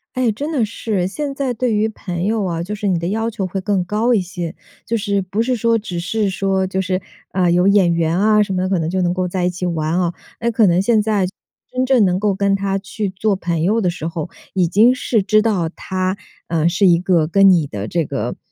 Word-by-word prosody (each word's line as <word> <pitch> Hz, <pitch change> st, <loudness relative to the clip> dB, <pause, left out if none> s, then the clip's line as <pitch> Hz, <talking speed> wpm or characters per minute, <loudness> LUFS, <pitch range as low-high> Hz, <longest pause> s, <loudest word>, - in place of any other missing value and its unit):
哎， 255 Hz, -3 st, +2 dB
真 285 Hz, +9 st, -4 dB
的 280 Hz, -7 st, +1 dB
是 215 Hz, -1 st, -2 dB
哎。 180 Hz, -, +1 dB
现 280 Hz, +7 st, -4 dB
在 270 Hz, -3 st, -1 dB
对 240 Hz, -1 st, -1 dB
于 215 Hz, +1 st, +1 dB
朋 180 Hz, -5 st, -5 dB
友 215 Hz, 0 st, 0 dB
啊， 170 Hz, -2 st, -2 dB
就 205 Hz, +4 st, -5 dB
是 210 Hz, -1 st, -3 dB
你 185 Hz, -, +2 dB
的 170 Hz, +1 st, -2 dB
要 225 Hz, +3 st, -1 dB
求 205 Hz, -3 st, -3 dB
会 185 Hz, +1 st, -3 dB
更 195 Hz, -1 st, 0 dB
高 215 Hz, +6 st, +1 dB
一 215 Hz, -, +3 dB
些。 175 Hz, -3 st, -6 dB, 0.3 s
就 230 Hz, -, -1 dB
是， 200 Hz, -2 st, 0 dB
不 195 Hz, +4 st, -2 dB
是 255 Hz, 0 st, 0 dB
说 230 Hz, +1 st, +2 dB
只 185 Hz, -5 st, -5 dB
是 205 Hz, +3 st, -1 dB
说 190 Hz, 0 st, 0 dB
就 190 Hz, 0 st, -2 dB
是， 185 Hz, 0 st, -1 dB, 0.3 s
啊， 180 Hz, -2 st, +2 dB
有 180 Hz, +2 st, +3 dB
眼 195 Hz, -4 st, +4 dB
缘 165 Hz, +1 st, +1 dB
啊 210 Hz, +1 st, +4 dB
什 200 Hz, -2 st, 0 dB
么 185 Hz, -, 0 dB
的， 185 Hz, -, -1 dB
可 190 Hz, -3 st, +1 dB
能 160 Hz, -, -1 dB
就 185 Hz, +1 st, 0 dB
能 175 Hz, -1 st, +1 dB
够 185 Hz, 0 st, -1 dB
在 180 Hz, 0 st, -2 dB
一 180 Hz, -, +2 dB
起 180 Hz, 0 st, -4 dB
玩 165 Hz, 0 st, -1 dB
哦。 175 Hz, -1 st, 0 dB, 0.3 s
呃， 235 Hz, 0 st, 0 dB
可 225 Hz, -3 st, +3 dB
能 175 Hz, +2 st, +3 dB
现 220 Hz, +1 st, +3 dB
在 210 Hz, -3 st, +1 dB
去 185 Hz, -, -8 dB, 0.4 s
真 255 Hz, 0 st, -1 dB
正 250 Hz, -6 st, +4 dB
能 180 Hz, 0 st, +1 dB
够 205 Hz, 0 st, +1 dB
跟 200 Hz, +1 st, +1 dB
他 195 Hz, 0 st, -1 dB
去 200 Hz, +1 st, -4 dB
做 195 Hz, +2 st, 0 dB
朋 170 Hz, -3 st, -2 dB
友 220 Hz, +6 st, +2 dB
的 180 Hz, -, +1 dB
时 165 Hz, -2 st, -4 dB
候， 165 Hz, 0 st, -4 dB, 0.2 s
已 180 Hz, -3 st, +1 dB
经 230 Hz, +7 st, +5 dB
是 235 Hz, -3 st, 0 dB
知 215 Hz, +2 st, +3 dB
道 200 Hz, -7 st, +1 dB
他， 185 Hz, 0 st, -2 dB, 0.3 s
嗯， 165 Hz, 0 st, +1 dB
是 180 Hz, +3 st, +2 dB
一 175 Hz, -2 st, +6 dB
个 175 Hz, -3 st, +2 dB
跟 195 Hz, +3 st, +5 dB
你 165 Hz, -5 st, +3 dB
的 105 Hz, -3 st, -5 dB
这 170 Hz, -3 st, 0 dB
个， -, -, -3 dB
195 Hz, 275 characters per minute, -19 LUFS, 175-215 Hz, 0.4 s, 一